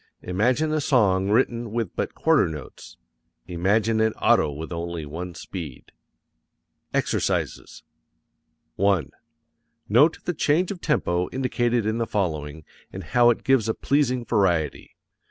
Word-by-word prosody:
Imagine 125 +12 +1
a 155 - +1
song 100 -9 +2
written 120 +1 +1
with 115 -5 -3
but - - -3
quarter - - +3
notes. 75 -4 -9 0.5
Imagine 105 +6 +1
an 110 0 +2
auto - - +2
with 80 +4 -7
only 85 -1 -4
one 85 +4 -7
speed. 80 -6 -8 1.0
EXERCISES - - -2 0.9
1. 95 -6 +1 0.8
Note 145 +10 +4
the 175 - -1
change 160 +4 +1
of 185 -3 -7
tempo 90 - 0
indicated 120 -3 0
in 110 +2 -1
the 115 - -1
following, 80 -6 -3 0.3
and 95 - -7
how 120 +8 +4
it 120 - 0
gives 130 -5 +2
a 110 - 0
pleasing 130 -4 0
variety. 90 - 0
105 Hz, 130 wpm, -24 LUFS, 85-125 Hz, 1.0 s, Note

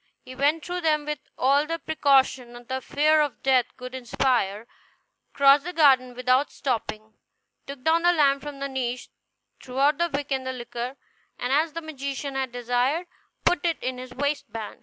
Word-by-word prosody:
He 255 - -10
went 290 +4 +1
through 355 0 -3
them 305 -2 +1
with 300 -1 -3 0.2
all 280 +3 +3
the 330 +1 -2
precaution 265 -6 +2
the 260 0 -3
fear 305 +4 +3
of 295 -3 -3
death 255 -2 +3
could 250 0 -8
inspire, 240 -4 0 0.7
crossed 280 0 +5
the 355 +2 -5
garden 265 -6 +4
without 255 +3 +2
stopping, 220 -4 -3 0.5
took 275 -2 -8
down 325 +2 +3
the 350 +1 +5
lamp 280 -4 +3
from 295 -1 -7
the 275 0 -3
niche, 250 -2 -4 0.5
threw 255 0 -9
out 285 +2 +3
the 345 0 +1
wick 285 0 -3
and 265 -1 0
the 260 - -2
liquor, 245 +1 -6 0.4
and, 250 +2 -2
as 310 +2 +2
the 335 - -4
magician 280 -2 -5
had 265 -2 -2
desired, 245 +7 0 0.4
put 355 - +2
it 335 -2 +1
in 255 0 -3
his 255 0 -9
waistband. 280 -6 -3
275 Hz, 180 wpm, -25 LUFS, 255-300 Hz, 0.7 s, crossed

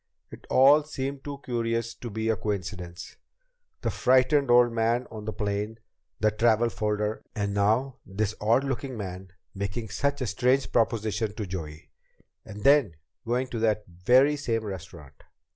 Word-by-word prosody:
It - - -12
all 140 +4 +6
seemed 140 -2 -5
too 140 -1 -7
curious 115 -1 -1
to 120 - -8
be 110 +1 -2
a 110 - +3
coincidence. 90 -3 -5 0.6
The - - -1
frightened 130 +2 +3
old 120 0 +6
man 115 +2 +1
on 110 -2 -8
the 110 - -2
plane 105 +1 -3 0.4
the 110 0 +3
travel 115 +2 +3
folder 105 -1 -2
and 100 -2 -1
now 110 +6 +1
this 105 +2 -2
odd 115 +5 +3
looking 135 -1 -3
man 95 -2 -6 0.3
making 100 +3 -4
such 140 +6 -1
a - - 0
strange 125 +5 +1
proposition 110 -2 0
to 105 - -4
Joey 80 -4 -7 0.5
and 105 -1 -10
then 140 - +5 0.3
going 125 +2 +1
to 115 - -4
that 110 -1 +1
very 125 +12 +3
same 115 -6 -2
restaurant! 85 -8 -9
110 Hz, 155 wpm, -27 LUFS, 100-125 Hz, 0.6 s, all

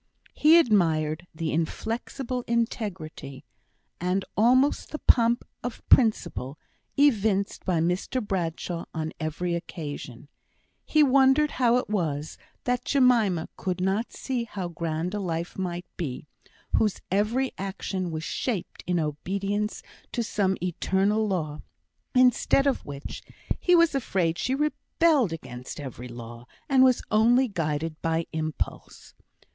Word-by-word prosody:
He 315 +3 +6
admired 170 - +2
the 160 0 -2
inflexible 235 - -2
integrity 185 - -3 0.5
and 180 +2 0
almost 255 +6 +3
the 305 - -4
pomp 235 -3 +3 0.2
of 245 -1 -6
principle 155 - +3 0.4
evinced 220 -8 +2
by 175 -4 +1
Mr 180 +9 0
Bradshaw 175 -5 -3
on 160 0 -3
every 170 +2 -2
occasion; 145 -6 -6 0.6
he 310 -1 +5
wondered 275 +2 +4
how 245 -2 +3
it 250 - -1
was 160 -7 -2 0.2
that 250 -1 0
Jemima 235 - +3
could 185 -1 -2
not 195 +5 0
see 250 -3 -3
how 190 -5 -5
grand 165 +1 -3
a 210 - -1
life 170 -3 -3
might 180 -2 -3
be, 145 -5 -4 0.5
whose 210 -3 +1
every 225 +7 +1
action 190 -1 -3
was 160 -1 -4
shaped 210 +1 -3
in 180 -1 +1
obedience 195 +7 -2 0.3
to 240 - 0
some 195 -4 0
eternal 195 +4 +1
law; 155 -6 -2 0.5
instead 255 +2 +4
of 275 -2 +1
which, 140 -1 -7 0.4
he 360 - +4
was 335 -2 +5
afraid 185 -10 0
she 260 - 0
rebelled 300 - +2
against 130 -6 -7
every 125 -3 -7
law, 120 0 -10 0.2
and 265 -2 +5
was 255 -2 +4
only 240 +4 +4
guided 160 -4 -2
by 165 0 0
impulse. 155 -1 -4
190 Hz, 125 wpm, -26 LUFS, 160-240 Hz, 0.6 s, He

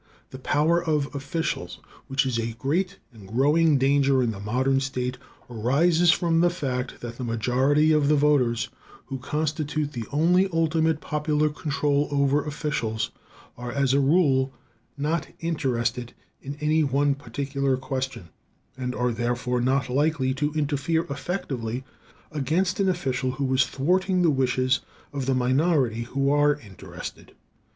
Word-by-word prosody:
The 130 - -8
power 155 +6 +2
of 150 -3 0
officials, 135 - -3 0.3
which 135 0 +1
is 125 -3 -1
a 115 0 -2
great 180 +10 -1 0.2
and 105 -4 -13
growing 145 +7 +3
danger 135 0 +3
in 115 - 0
the 100 - -7
modern 130 +6 +1
state, 125 -2 -3 0.3
arises 160 +9 +3
from 165 -1 +2
the 175 - +4
fact 130 -7 -4
that 120 -1 -7
the - - -3
majority 130 +6 +2
of 150 -2 +3
the 150 - +4
voters, 135 -6 +2 0.4
who 135 - -5
constitute 150 +1 -2
the 115 -4 -5
only 175 +6 +3
ultimate 160 -1 +1
popular 150 0 0
control 145 -1 0
over 140 0 +2
officials, 145 -8 -2 0.4
are 120 0 -6
as 135 +1 +1
a 140 - +4
rule 135 -3 +3 0.5
not 155 +4 -1
interested 125 -7 -1 0.3
in 140 +1 -6
any 155 +1 +2
one 140 +1 +2
particular 140 0 -2
question, 130 -8 -4 0.5
and 125 -1 -4
are 125 0 0
therefore 120 +1 -1
not 130 +1 +1
likely 135 0 +1
to 145 +3 -1
interfere 155 +2 0
effectively 135 - -3 0.5
against 160 +7 0
an 195 -1 +3
official 130 -7 -1
who 130 -1 -1
is 130 0 +3
thwarting 185 +5 +1
the 165 - +4
wishes 130 -1 +1 0.3
of 135 -2 -3
the 135 - +2
minority 130 -2 +1
who 135 +3 0
are 145 0 +4
interested. 100 -7 -10
140 Hz, 145 wpm, -25 LUFS, 125-155 Hz, 0.5 s, the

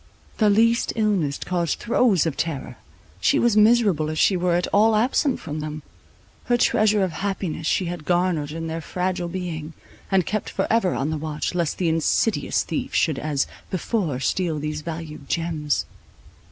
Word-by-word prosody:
The 215 -2 +5
least 230 +3 +3
illness 200 -11 +1
caused 170 -4 -1
throes 230 - +2
of 160 -4 -1
terror; 160 -5 -4 0.4
she 85 - +3
was 240 -3 +3
miserable 210 -8 +4
if 155 - -4
she 190 - +4
were 175 -1 +1
at 175 - +1
all 215 +2 +5
absent 255 +4 +1
from 155 -1 -5
them; 155 0 -5 0.6
her 245 - +2
treasure 215 -4 +3
of 185 - -1
happiness 185 -4 -3
she 185 - +1
had 175 -2 -5
garnered 175 -3 +1
in 165 +1 -5
their 165 0 -4
fragile 180 +1 -2
being, 170 -3 -5 0.4
and 190 -3 +2
kept 215 0 -2
forever 225 -6 +1
on 140 +4 -1
the 155 - -2
watch, 155 +1 -3
lest 170 -3 -1
the 180 - 0
insidious 165 +7 +1
thief - - -4
should 155 -5 +2
as 145 -2 0 0.2
before 185 - -1
steal 165 +4 0
these 150 0 -3
valued 155 -3 -7
gems. 160 -3 -1
175 Hz, 165 wpm, -23 LUFS, 155-205 Hz, 0.6 s, The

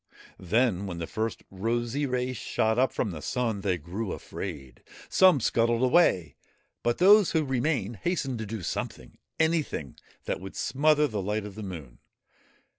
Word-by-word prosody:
Then, 100 0 +1
when 90 -3 -5
the 85 - -3
first 110 +6 -3
rosy 120 +8 -1
ray 125 0 -1
shot 110 -1 0
up 130 - +3
from 105 - -2
the 80 -3 -7
Sun, 115 -3 -1
they 95 -2 0
grew 90 +7 -4
afraid. 75 -9 -7 0.3
Some 185 -6 +6
scuttled 115 +1 +2
away, 125 - +3 0.4
but 120 0 0
those 200 +1 +6
who 160 -2 +2
remained 125 -5 -1
hastened 135 - -2
to 110 - -4
do 110 -2 -5
something - - -5 0.2
anything 160 - 0 0.3
that - - -2
would 95 0 -8
smother 150 +2 +2
the 105 -5 -3
light 105 +2 -2
of 105 - -8
the 110 - -8
Moon. 80 - -8
115 Hz, 160 wpm, -28 LUFS, 95-130 Hz, 0.4 s, Some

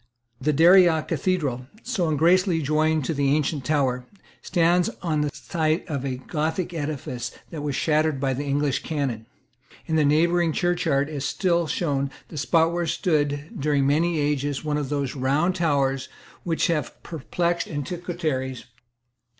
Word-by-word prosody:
The 150 +4 +2
Daria 165 +1 +6
Cathedral, 140 -10 -1 0.2
so 205 -9 -1
ungracefully 170 +2 +3
joined 155 0 +1
to 165 - -1
the 140 -1 +2
ancient 150 -2 -1
tower, 125 -3 0 0.3
stands 175 0 +2
on 155 -4 0
the 150 - 0
site 160 +1 -1
of 140 -5 -3
a 135 -2 -2
Gothic 160 +6 -2
edifice 145 -6 -4 0.2
which 155 - -5
was 145 -2 -2
shattered 155 -2 +1
by 135 -1 0
the 135 +3 -3
English 145 -1 0
cannon. 135 -8 -3 0.6
In 160 - 0
the 155 - +4
neighbouring 165 +3 +3
churchyard 160 -5 +1
is 145 -3 -5
still 170 +2 +1
shown 140 -5 -1 0.2
the 155 - -8
spot 165 +3 +2
where 170 -1 -1
stood, 145 -3 0
during 145 -1 +2
many 160 +4 +2
ages, 145 0 -1
one 150 -1 0
of 145 -3 -3
those 140 -2 -2
round 140 +7 +1
towers 140 -5 +1 0.3
which 165 -2 0
have 155 -7 -2
perplexed 170 +2 -2
antiquaries. 145 -5 -3
150 Hz, 150 wpm, -24 LUFS, 140-170 Hz, 0.6 s, Daria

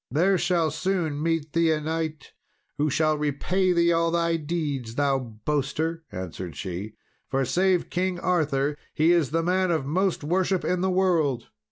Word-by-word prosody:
"There 180 +7 +2
shall 170 -4 +1
soon 165 -3 -1
meet 160 -2 -1
thee 165 0 +3
a 155 - +1
knight 155 -1 -4 0.5
who 150 +1 +2
shall 155 +2 +1
repay 175 +6 +1
thee 170 -1 +3
all 165 0 +2
thy 170 0 +1
deeds, 145 -7 -3
thou 140 -1 +2
boaster," 145 +7 -2
answered 90 -3 -6
she, 95 +7 -5 0.3
"for, 135 0 +1
save 185 +5 +1
King 180 0 -1
Arthur, 150 -6 +1 0.2
he 160 +3 +4
is 170 -6 +3
the 165 +2 0
man 185 +1 +1
of 160 -5 0
most 180 +3 0
worship 185 +3 0
in 180 0 0
the 190 - +1
world." 170 -10 +1
160 Hz, 165 wpm, -25 LUFS, 145-175 Hz, 0.5 s, he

